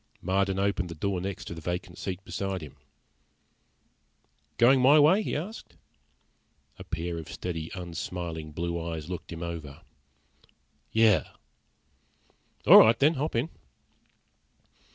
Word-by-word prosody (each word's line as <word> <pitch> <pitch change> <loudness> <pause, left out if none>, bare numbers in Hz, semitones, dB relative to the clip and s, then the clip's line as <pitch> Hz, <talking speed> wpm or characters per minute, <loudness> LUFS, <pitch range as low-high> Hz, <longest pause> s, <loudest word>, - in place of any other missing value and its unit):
Marden 95 +1 0
opened 95 -2 0
the 85 - -7
door 95 +3 -2
next 95 +1 -5
to - - -6
the 80 - -9
vacant 90 +2 -4
seat 95 0 -5
beside 95 -3 -4
him. 75 - -11 1.8
"Going 130 +2 +5
my 140 +4 +7
way?" 160 +8 +5
he - - -3
asked. 185 +10 -6 1.0
A - - -7
pair 85 0 -4
of 80 - -9
steady, 80 -3 -5
unsmiling 85 -2 -5
blue 85 +2 -3
eyes 80 0 -5
looked 90 - -6
him 85 0 -6
over. 80 -3 -7 1.1
"Yeah." 110 - +4 1.4
"All - - +10
right, 110 +1 +6
then. 145 +6 +4
Hop 150 0 -3
in." 120 +8 0
90 Hz, 130 wpm, -28 LUFS, 85-110 Hz, 1.8 s, All